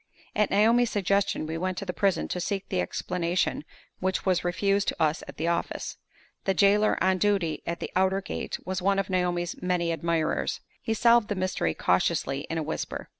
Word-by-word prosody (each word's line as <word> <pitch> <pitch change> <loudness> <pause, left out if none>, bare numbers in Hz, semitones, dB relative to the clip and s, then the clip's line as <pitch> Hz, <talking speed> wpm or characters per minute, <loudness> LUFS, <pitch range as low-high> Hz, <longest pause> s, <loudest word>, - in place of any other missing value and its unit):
At 210 -1 +2
Naomi's 230 +4 +4
suggestion, 200 -4 +1
we 160 +1 -4
went 185 0 -2
to 200 - -4
the 180 - -3
prison 195 -4 +1
to 180 - -2
seek 195 +2 -2
the 90 - +1
explanation 175 - -1 0.4
which 190 0 -1
was 185 -2 +2
refused 195 +3 +1
to - - -1
us 155 +1 +2
at - - -10
the 160 - -1
office. 170 0 -2 0.5
The 195 - +1
jailer 205 +2 +4
on 185 0 +2
duty 190 -7 +1
at 170 0 -2
the - - -5
outer 190 +1 +3
gate 195 - -4
was 185 0 -2
one 195 +1 +2
of 195 -1 -1
Naomi's 175 -2 -1
many 180 -2 0
admirers. 165 0 0 0.2
He 225 - -1
solved 235 -1 +5
the 205 - -2
mystery 185 - -1
cautiously 135 +1 +1
in 165 - -2
a 160 - -1
whisper. 155 - -4
185 Hz, 190 wpm, -27 LUFS, 170-200 Hz, 0.5 s, solved